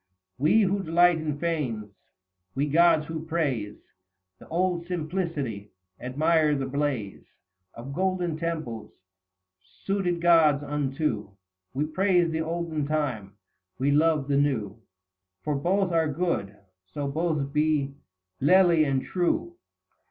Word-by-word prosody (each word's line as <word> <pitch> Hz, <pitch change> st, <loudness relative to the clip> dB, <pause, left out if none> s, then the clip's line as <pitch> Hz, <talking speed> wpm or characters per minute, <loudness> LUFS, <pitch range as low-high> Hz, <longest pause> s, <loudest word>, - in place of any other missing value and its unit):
We, 155 Hz, +11 st, +4 dB
who 200 Hz, 0 st, +1 dB
delight 175 Hz, 0 st, +4 dB
in 150 Hz, -2 st, -3 dB
fanes, 130 Hz, -11 st, -3 dB, 0.6 s
we 140 Hz, -, +1 dB
gods, 165 Hz, +1 st, +4 dB
who 160 Hz, 0 st, -5 dB
praise 145 Hz, -11 st, -2 dB, 0.6 s
The -, -, -14 dB
old 175 Hz, 0 st, -1 dB
simplicity, 155 Hz, -, -3 dB, 0.3 s
admire 150 Hz, +4 st, +2 dB
the 135 Hz, -1 st, -2 dB
blaze 135 Hz, -7 st, -2 dB, 0.5 s
Of 130 Hz, +4 st, -8 dB
golden 180 Hz, -1 st, -1 dB
temples, 155 Hz, -10 st, -4 dB, 0.9 s
suited 190 Hz, -3 st, 0 dB
gods 160 Hz, -4 st, +4 dB
unto. 140 Hz, -6 st, -2 dB, 0.5 s
We 145 Hz, +3 st, 0 dB
praise 175 Hz, +1 st, +2 dB
the 160 Hz, 0 st, -1 dB
olden 160 Hz, -2 st, -2 dB
time, 130 Hz, -10 st, -2 dB, 0.4 s
we 135 Hz, +3 st, +1 dB
love 150 Hz, -1 st, +2 dB
the 140 Hz, -1 st, +1 dB
new, 115 Hz, -7 st, -1 dB, 0.6 s
For 150 Hz, -, -1 dB
both 180 Hz, +6 st, +1 dB
are 160 Hz, -2 st, +1 dB
good, 140 Hz, -, -2 dB, 0.3 s
so 145 Hz, -1 st, -3 dB
both 150 Hz, -2 st, -1 dB
be 150 Hz, -2 st, +1 dB, 0.5 s
lele 180 Hz, +5 st, +5 dB
and 135 Hz, -3 st, 0 dB
true." 185 Hz, -, -1 dB
155 Hz, 120 wpm, -26 LUFS, 140-170 Hz, 0.9 s, lele